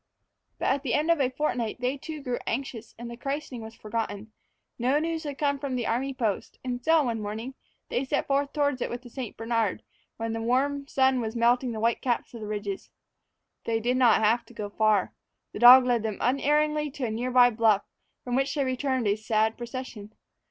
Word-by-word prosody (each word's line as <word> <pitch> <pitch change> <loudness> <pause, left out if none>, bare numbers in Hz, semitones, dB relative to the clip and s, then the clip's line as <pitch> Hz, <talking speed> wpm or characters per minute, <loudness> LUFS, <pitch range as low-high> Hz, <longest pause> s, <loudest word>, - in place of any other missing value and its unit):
But - - -3
at 275 - +1
the 270 -4 0
end 310 +3 +2
of 335 -4 +2
a 255 - +2
fortnight 250 -5 -2
they 250 +2 0
too 300 +1 -8
grew 250 -2 -2
anxious, 235 -2 -4
and 235 +1 -7
the 235 - -7
christening 275 -1 -4
was 220 0 -9
forgotten. 220 -1 -4 0.5
No 255 +4 +2
news 325 +1 -2
had 285 -2 -5
come 280 -1 0
from 275 -2 -3
the 240 -2 -2
army 260 +4 0
post, 225 -6 -2
and 250 -1 -4
so, 320 +1 +4
one 230 -4 -2
morning, 220 +5 -5 0.4
they 250 - 0
set 265 - -1
forth 280 0 0
toward 285 -3 0
it - - -1
with 240 +1 -6
the 245 - -12
St. 250 -3 -6
Bernard, 225 -3 -1 0.3
when 225 0 -3
the 225 - -3
warm 275 +4 0
sun 265 -2 +2
was 220 0 -4
melting 240 +2 +2
the 220 - -4
white 230 +1 +1
caps 245 -1 -1
of 230 - -8
the 210 - -5
ridges. 205 -2 -4 0.8
They 225 -1 0
did 245 +3 0
not 240 -4 +4
have 230 +3 +3
to 240 - -16
go 205 -2 -5
far. 215 -3 +2 0.4
The - - -7
dog 250 +1 +10
led 240 -2 +2
them 215 -2 -3
unerringly 300 +3 +1
to 275 -3 -3
a 225 - -2
near 240 +3 -2
by 245 -1 +6
bluff, 220 -3 +3 0.4
from 245 -1 -2
which 270 +3 0
they 285 - +1
returned 260 -1 -1
a 200 - +3
sad 220 0 +1
procession. 235 -3 -7
245 Hz, 215 wpm, -27 LUFS, 225-270 Hz, 0.8 s, dog